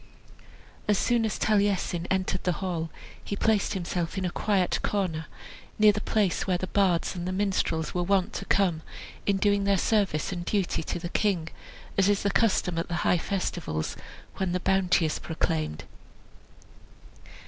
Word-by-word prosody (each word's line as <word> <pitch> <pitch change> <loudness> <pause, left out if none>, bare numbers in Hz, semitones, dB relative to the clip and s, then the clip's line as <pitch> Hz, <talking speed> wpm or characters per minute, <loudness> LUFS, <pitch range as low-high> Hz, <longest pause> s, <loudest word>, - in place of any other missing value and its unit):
As 210 -1 +3
soon 235 0 +2
as 215 - -2
Taliesin 200 -4 +1
entered 185 -1 0
the 180 - +1
hall 170 -3 -3 0.3
he 200 - -3
placed 210 -1 +1
himself 175 0 -2
in 190 - -1
a 180 - -1
quiet 195 -3 +1
corner, 170 -6 -1 0.5
near 215 0 +7
the 210 +1 -3
place 205 -6 0
where 185 -1 +2
the 185 - -3
bards 185 -3 +1
and 175 -1 -4
the - - -1
minstrels 185 -5 0
were 180 - 0
wont 190 +1 +1
to - - -4
come, 180 -5 +2 0.5
in 200 -1 +3
doing 200 0 +2
their 200 0 +3
service 195 -6 +1
and 175 -2 -4
duty 195 -2 0
to 160 - -3
the 170 0 -5
king, 180 -5 0 0.5
as 195 +1 +4
is 205 -1 +2
the 200 - +2
custom 185 -7 +2
at 165 - -2
the 170 - -3
high 180 - +4
festivals, 175 - -2 0.4
when 190 -2 -1
the 180 - 0
bounty 185 -3 +3
is 155 - -1
proclaimed. 80 - -2
185 Hz, 170 wpm, -27 LUFS, 175-200 Hz, 0.5 s, near